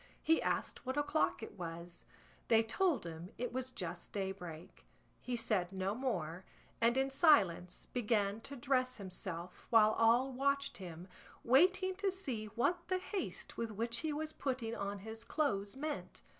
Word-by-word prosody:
He 325 0 +4
asked - - -1
what 260 +2 -3
o'clock 290 -4 +1
it 210 - -9
was; 170 0 -7 0.4
they 225 -1 +5
told 310 +8 +1
him 165 +1 -6
it 245 0 -3
was 260 0 -2
just 180 -8 -6
daybreak. 190 -3 -6 0.3
He 250 - -3
said 210 -6 0
no 190 +1 -1
more, 185 -9 -2 0.4
and 235 +2 +4
in 270 0 +2
silence 195 - +4
began 215 -3 0
to 280 - -7
dress 255 0 +1
himself, 180 -3 -6
while 215 -2 +7
all 235 +4 +4
watched 280 +1 +1
him, 175 -1 -8 0.4
waiting 370 +9 +5
to 400 0 +1
see 270 - -3
what 245 - 0
the 370 - +1
haste 375 +1 -4
with 230 -1 -1
which 230 +2 -1
he 315 - -1
was 310 +1 -3
putting 250 -4 -2
on 200 -1 -3
his 225 0 -7
clothes 205 -9 0
meant. 295 +2 -4
230 Hz, 155 wpm, -36 LUFS, 195-275 Hz, 0.4 s, while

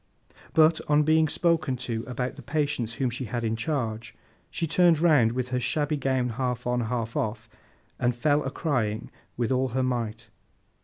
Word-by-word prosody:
But, 160 0 +5
on 150 0 +4
being 155 +1 +4
spoken 160 -4 +1
to 115 -2 -3
about 125 0 -3
the - - -10
patients 145 -6 -1
whom 125 0 -1
she 125 +2 -4
had 120 +2 -3
in 115 0 0
charge, 115 -4 -3 0.3
she 165 - -2
turned 170 +1 +4
round, 145 -9 +4
with 125 0 -2
her 125 0 0
shabby 150 +4 0
gown 130 -3 0
half 125 +1 -2
on, 125 0 +1
half 115 -1 -3
off, 110 +1 -2 0.5
and 120 -1 +1
fell 145 +4 +2
a 135 - -2
crying 120 -8 -2 0.3
with 120 0 0
all 130 0 +2
her 130 - +2
might. 115 -3 -3
125 Hz, 175 wpm, -26 LUFS, 115-150 Hz, 0.5 s, But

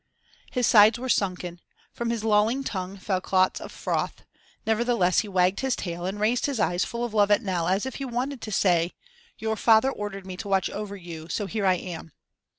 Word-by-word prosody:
His 250 -1 +1
sides 215 +1 +7
were 255 +2 -5
sunken, 180 -5 -1 0.3
from 235 -1 -3
his 230 -2 -2
lolling 220 +5 +2
tongue 190 -5 -4
fell 190 -1 -1
clots 185 0 +2
of - - -8
froth; - - -3 0.4
nevertheless 220 -5 +2
he 215 - -2
wagged 185 -1 +2
his 265 -2 0
tail 175 0 -4
and 195 +2 -4
raised 230 +6 +1
his 275 -5 -2
eyes 180 -3 +1
full 235 +1 -3
of 235 - -6
love 205 -2 +4
at 205 +3 +3
Nell 180 -4 -1
as 190 +5 +1
if 265 - -5
he 275 - -4
wanted 255 +1 -3
to 215 - -6
say: 175 -3 +2 0.4
"Your 220 0 -1
father 225 +4 +4
ordered 205 -4 -6
me 185 -1 -7
to 205 - -6
watch 195 -2 +1
over 205 -1 -5
you, 170 -3 -9
so 205 - -2
here 200 0 -1
I 185 - +5
am." 170 -3 -7
205 Hz, 210 wpm, -26 LUFS, 185-230 Hz, 0.4 s, sides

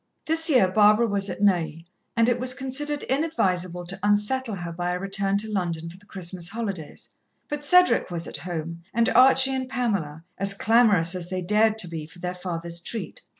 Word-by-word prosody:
This 325 +1 +3
year, 250 -10 +4
Barbara 210 +4 +4
was 200 -2 -1
at 200 - -5
Neuilly, 165 -4 0 0.3
and 230 0 +4
it 245 0 +1
was 255 +1 +2
considered 280 +2 -2
inadvisable 185 - -1
to 190 +2 -4
"unsettle" 210 +4 0
her 175 -2 -6
by 175 +1 -3
a 180 - -3
return 195 +1 -1
to 215 +2 +1
London 170 -4 -3
for 180 - -14
the 205 - -23
Christmas 180 -2 -3
holidays. 200 -8 -5 0.4
But 295 0 -5
Cedric 360 - +4
was 170 -1 -4
at - - -6
home, 170 -1 -6
and 235 +1 +2
Archie 265 +1 +6
and 260 -1 -3
Pamela, 200 - -3
as 195 +1 +3
clamorous 205 -6 +3
as 180 -1 -5
they 185 -1 -4
dared 215 +3 +2
to 205 -5 +1
be 160 -2 -7
for 165 - -15
their 180 0 -4
father's 170 -2 -4
treat. 220 +6 -6
195 Hz, 195 wpm, -24 LUFS, 175-240 Hz, 0.4 s, Archie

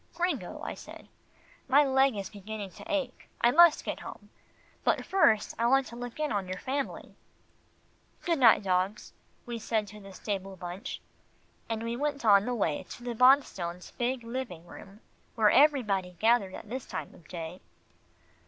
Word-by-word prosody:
"Gringo," 335 - -2
I - - -4
said, - - -12 0.6
"my 275 +3 +6
leg 265 -2 +3
is 200 -1 -5
beginning 205 -1 -7
to - - -10
ache. 275 -4 -3
I 240 - +5
must 340 +2 +6
get - - -3
home, - - -10 0.5
but - - +1
first 220 - +3
I 235 - +3
want 270 +2 +4
to 235 - -10
look 245 +3 -7
in 305 -3 -1
on 200 -3 -1
your 185 0 -4
family." 270 +6 -4 1.1
"Good 335 -4 0
night, 230 -4 +6
dogs," 190 +2 -1 0.3
we 235 -1 -5
said 220 -1 -1
to 210 +1 -11
the 195 -1 -12
stable 195 0 -4
bunch, 185 - -7 0.7
and 225 0 -2
we 230 +1 -2
went 285 -1 -2
on 200 -1 +6
the 245 - -1
way 165 -9 0
to 240 - -9
the 245 -1 -3
Bonstones' 220 -9 +2
big 245 0 -1
living 230 -8 -5
room, 195 +4 -13 0.3
where 215 -3 +4
everybody 215 -11 +3
gathered 220 -3 +2
at - - -10
this 250 +3 -6
time - - -6
of 160 - -18
day. 170 +1 -7
225 Hz, 170 wpm, -29 LUFS, 195-265 Hz, 1.1 s, my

